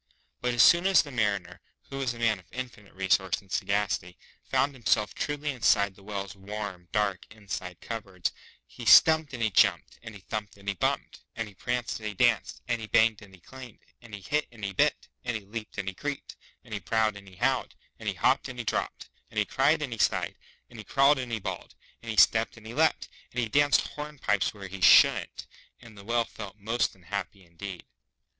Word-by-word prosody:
But 125 -1 0
as 120 - +7
soon 175 +2 +6
as 195 - +5
the 145 - -10
Mariner, 100 -7 -1 0.3
who 135 - -4
was 125 -3 -1
a - - -10
man 115 -3 +1
of 90 - -19
infinite 125 -6 -8
resource 95 -1 +1
and 95 -2 -21
sagacity, 95 -4 -1 0.3
found 140 +1 +1
himself 110 -4 +1
truly 145 0 -2
inside 100 -6 +2
the 100 - -19
Whale's 100 -2 -5
warm, 100 -2 -6
dark, 105 -3 0
inside 100 -4 -7
cup 115 -1 -5
boards, 90 -3 -3 0.3
he - - -11
stumped 160 -2 +7
and 120 -3 -4
he 110 - +1
jumped - - +2
and 115 -2 -10
he 100 - -12
thumped 105 +1 -5
and 100 0 -17
he 100 - +1
bumped, 90 - -2 0.2
and 115 -1 -3
he 105 - -13
pranced 125 +5 -3
and 110 - -5
he 105 - -8
danced, - - +1
and 115 - -1
he 110 - -6
banged 110 0 +3
and 100 -2 -14
he 90 - -23
clanged, 130 +2 -12 0.2
and 115 -3 -9
he 100 - -10
hit 150 +9 -1
and 115 -3 -14
he 100 -1 -2
bit, - - +1 0.2
and 120 -2 -1
he 105 - -12
leaped 110 +2 -7
and 100 -1 -3
he 95 - -2
creeped, 145 +8 -5 0.3
and - - -11
he - - -2
prowled 110 -2 +1
and 100 -1 -12
he 95 - -14
howled, - - 0 0.2
and - - -2
he - - -3
hopped - - +2
and - - -8
he - - -4
dropped, - - -2 0.2
and - - -12
he - - +3
cried 150 +3 +2
and 130 -5 -3
he 115 - -8
sighed, - - +1 0.3
and 115 - -13
he - - -7
crawled 135 +5 +4
and 125 -2 -5
he 115 - 0
bawled, - - -6 0.3
and 115 - -9
he 110 - -3
stepped 110 +4 +4
and 110 - -14
he 115 - -7
lepped, 160 +4 +2 0.2
and 125 - -3
he 120 - 0
danced 145 +5 +3
hornpipes 145 -10 -1
where 100 -2 -9
he 95 0 -9
shouldn't, - - +5 0.3
and 115 -3 -14
the 100 - -12
Whale 115 +2 +1
felt 105 -2 -9
most 110 +2 -1
unhappy 95 +1 -6
indeed. 85 +2 -8
110 Hz, 220 wpm, -28 LUFS, 100-120 Hz, 0.3 s, as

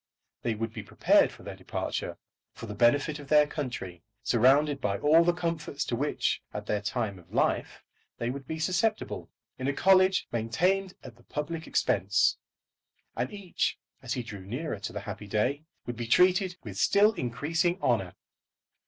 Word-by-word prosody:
They 115 -2 -1
would 115 +1 -4
be 110 - -5
prepared 100 - +3
for - - -14
their - - -7
departure, - - -4 0.4
for - - -8
the 105 - -6
benefit 145 +8 +2
of 145 - -10
their 150 +1 +6
country, 120 - -5 0.2
surrounded 135 +4 +3
by 100 -3 0
all 155 +6 +5
the 175 - +4
comforts 165 -4 -3
to 120 - -1
which, 145 +5 0
at - - -4
their 105 -1 -1
time 100 -2 -2
of 85 - -20
life, - - 0 0.3
they 120 +1 -2
would 135 0 -7
be 160 - -3
susceptible, 185 +7 -1 0.3
in 130 - -2
a 140 - +1
college 185 +3 +4
maintained 180 - 0
at 120 -3 -11
the 120 - -21
public 160 +2 -4
expense; 100 +3 +2 0.8
and 125 - -2
each, 200 -4 -2 0.2
as 120 -2 -3
he 125 - -3
drew 105 -3 -8
nearer 125 - -4
to 100 - -5
the 105 - -5
happy 105 +1 -7
day, 130 +9 0 0.2
would 120 -1 -5
be 120 -1 -4
treated 180 - +4
with 100 -4 -7
still 210 +2 +5
increasing 165 - -1
honour. 95 - 0
135 Hz, 170 wpm, -29 LUFS, 115-165 Hz, 0.8 s, their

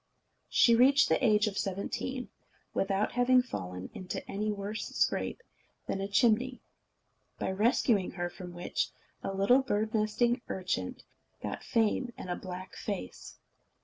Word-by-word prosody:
She 235 - +5
reached 270 +4 +6
the - - +2
age 210 -3 +5
of 205 -2 -2
seventeen, 200 +6 -3 0.4
without 195 +1 +1
having 250 +1 +4
fallen 90 - -6
into 185 - -6
any 210 +2 -1
worse 205 +1 -4
scrape 470 - 0 0.4
than 195 - -2
a 195 - -1
chimney; 240 +4 +3 0.8
by - - -1
rescuing 210 -1 +2
her 175 0 -2
from 180 0 -9
which, 175 0 -2 0.3
a - - -3
little 200 +7 +4
bird 215 -4 -1
nesting 235 +3 +2
urchin 180 - -2 0.5
got - - -4
fame 230 +2 +1
and 180 - -5
a - - 0
black 185 0 -7
face. 200 - -6
210 Hz, 140 wpm, -31 LUFS, 190-240 Hz, 0.8 s, reached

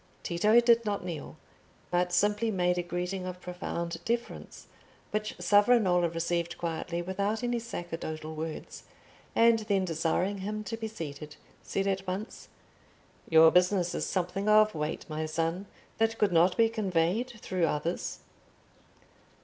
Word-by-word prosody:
Tito 210 +7 +4
did 235 -1 +4
not 205 -3 -2
kneel, 170 -4 -6 0.5
but 175 0 +1
simply 210 +5 +2
made 180 -3 +1
a - - +2
greeting 180 +2 -3
of 180 0 -6
profound 175 -1 -5
deference, 235 0 -4 0.5
which 215 0 -2
Savonarola 205 -5 +4
received 170 +1 -2
quietly 170 +1 -3
without 200 +5 -2
any 240 -1 0
sacerdotal 165 -7 -6
words, 155 0 -6 0.5
and 230 0 +5
then 200 -3 0
desiring 175 +4 0
him 210 +2 -4
to 225 - -4
be 225 -1 -4
seated, 150 -7 -7 0.3
said 195 - -2
at 195 -1 -1
once— 195 +5 -5 0.8
"Your 160 0 +7
business 180 0 +3
is - - -2
something 190 +2 -1
of 215 0 +6
weight, 150 -1 -3
my 155 0 -3
son, 165 +5 -2 0.3
that 225 0 +2
could 205 -2 +2
not 175 +2 +4
be 230 -1 +5
conveyed 210 +2 0
through 180 -5 0
others?" 160 +4 -3
185 Hz, 140 wpm, -29 LUFS, 170-215 Hz, 0.8 s, Your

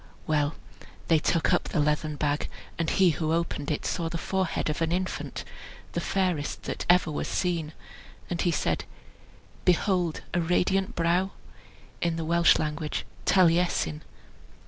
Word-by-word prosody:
Well! 150 -1 +1 0.5
they 165 -2 +5
took 165 +3 +2
up 175 - +2
the 165 - -1
leathern 150 +1 +1
bag, 145 0 -1 0.3
and 165 -2 +1
he 185 -3 +4
who 155 0 -1
opened 165 -3 -1
it 150 - -2
saw 165 -2 -1
the 170 - -3
forehead 190 +1 -1
of 155 +1 -2
an 165 0 +1
infant, 185 +1 -2 0.5
the - - -2
fairest 180 -7 -1
that - - -4
ever 175 -2 +5
was 150 - -2
seen; 170 -4 -1 0.5
and 175 -1 -2
he 175 - +2
said, 165 - 0 0.8
"Behold 180 -2 +2
a 175 - +2
radiant 185 +3 +1
brow?" 175 +3 +1 0.7
(In 170 -1 +1
the 165 -1 -3
Welsh 170 +1 +5
language, 150 0 -2 0.2
taliesin.) 170 - +3
165 Hz, 145 wpm, -27 LUFS, 155-180 Hz, 0.8 s, they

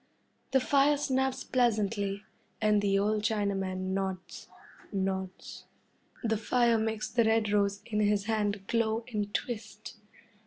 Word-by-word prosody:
The 265 0 +4
fire 280 +2 +3
snaps 265 -2 0
pleasantly, 210 -4 0 0.4
and 210 -1 +3
the 195 -1 +2
old 210 +2 +1
Chinaman 195 -4 -1
nods 190 -1 -4 0.4
nods. 190 -2 -4 0.6
The 220 -1 +1
fire 235 +1 +2
makes 220 -1 -1
the 235 +1 +2
red 220 -1 +2
rose 200 -1 +1
in 215 -2 -2
his 205 -1 +2
hand 205 -2 -1
glow 225 +1 0
and 205 -1 -2
twist. 215 -2 -5
210 Hz, 125 wpm, -30 LUFS, 200-230 Hz, 0.6 s, The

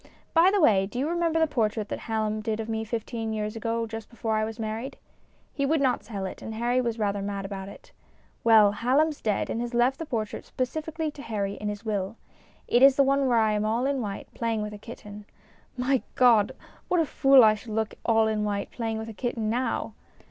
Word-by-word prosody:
By 335 +3 +6
the 405 +1 +2
way, 195 - +4
do 225 - -8
you 270 +4 0
remember 335 -1 +1
the 320 - +5
portrait 220 -6 -1
that - - -3
Hallom 215 -1 -2
did 220 0 -2
of 220 - -4
me 220 -1 -2
fifteen 225 0 -4
years 215 0 -3
ago, 230 +1 -1
just 225 -1 -7
before 225 -2 -2
I 215 - +1
was 220 +1 -4
married? 225 +3 -4 0.6
He 280 - -2
would 305 +3 +2
not 265 -3 +1
sell 200 -4 -5
it, 190 - -7
and 220 - -6
Harry 240 +3 +1
was 235 -2 -2
rather 205 -2 -1
mad 200 -1 -4
about 195 -1 -6
it. - - -14 0.5
Well, 220 -3 +6
Hallom's 275 +8 +1
dead 210 -3 0
and 230 - -2
has 240 0 -4
left 245 +3 +2
the 325 - -5
portrait 220 -5 -3
specifically 315 +4 -3
to 290 - -11
Harry 200 -5 -2
in 210 +1 -4
his 210 +2 -6
will. 205 -1 -2 0.5
It 240 - +3
is 270 0 +8
the 275 - +5
one 275 0 +2
where 240 -2 +3
I 220 -1 +3
am 210 0 0
all 225 +4 0
in 275 -1 0
white, 200 -3 -5
playing 225 -2 -1
with 210 0 -5
a 205 - -9
kitten. 210 -2 -10 0.5
My 255 +1 +1
God! 235 -6 +5 0.3
What 360 - +2
a 325 - +3
fool 270 -3 +6
I 215 -1 +7
should 215 +1 -8
look 220 0 -1
all 225 -1 +3
in 215 -1 0
white, 205 -1 -2
playing 225 -2 -3
with 220 0 -5
a 225 - -7
kitten 225 -1 -2
now 250 +2 -1
225 Hz, 230 wpm, -27 LUFS, 215-255 Hz, 0.6 s, is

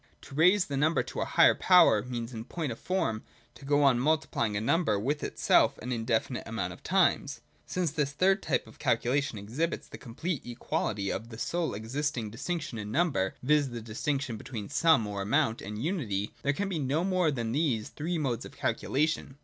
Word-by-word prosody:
To - - -13
raise 180 +6 +4
the 140 - -3
number 155 +4 +2
to - - -5
a - - 0
higher - - +5
power 175 - +5
means 120 +1 -5
in 110 0 -6
point 155 -2 -3
of 115 - -7
form 115 -13 -1 0.3
to - - -14
go 145 +1 +3
on 130 -4 +5
multiplying 125 -7 0
a - - +1
number 120 - +1
with 145 +8 -1
itself - - +3
an 125 - -6
indefinite 115 +1 -1
amount 95 -6 -3
of - - -15
times. - - +1
— 75 0 -36
Since 180 -4 -1
this 150 -2 -1
third 190 +7 +2
type - - 0
of - - -16
calculation 135 -1 0
exhibits 125 +12 -3
the - - -10
complete 145 +6 -4
equality 110 -4 -2
of 115 - -5
the 110 - -9
sole 165 +1 -2
existing 120 +1 -3
distinction 145 0 -4
in 105 0 -5
number, 125 - +1
viz. 145 0 +3
the 120 -1 -6
distinction 120 +3 -2
be - - -11
tween 110 -6 -6
Sum 160 -9 +4
or 100 -1 -4
amount 115 +3 +1
and 105 +1 -6
Unity, 115 - -2
there 140 +1 +1
can 200 +7 -2
be 180 -5 -2
no 145 +4 0
more 185 -3 +2
than 120 -6 -2
these 125 -6 0
three 165 +3 -3
modes 130 -7 -1
of - - -10
calculation. 145 -1 -1
135 Hz, 200 wpm, -29 LUFS, 110-155 Hz, 0.3 s, higher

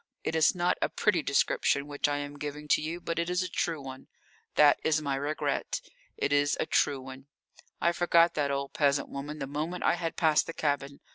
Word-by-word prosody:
It - - -2
is 160 +3 +4
not 175 0 +1
a - - +1
pretty 195 -6 +1
description 140 0 +1
which 145 0 -1
I 145 - 0
am 145 0 -6
giving 150 +1 -6
to - - +4
you, 160 +3 -4
but 170 -1 -3
it 170 +1 -1
is 180 +1 +1
a - - -3
true 165 -2 -2
one. 130 -1 -9 0.5
That 150 -1 +6
is 155 0 +2
my 140 -3 -2
regret, 145 +3 -2 0.4
it 145 - 0
is 145 0 +2
a - - +1
true 140 -2 +1
one. 135 +1 -11 0.5
I 170 - +3
forgot 170 -1 +3
that 145 -2 0
old 140 0 -3
peasant 140 -1 +1
woman 145 +2 -6
the 135 - -4
moment 155 +6 -4
I - - +4
had 170 -1 -3
passed 155 -2 +3
the 165 - -5
cabin. 140 -2 -2
150 Hz, 215 wpm, -29 LUFS, 140-165 Hz, 0.5 s, That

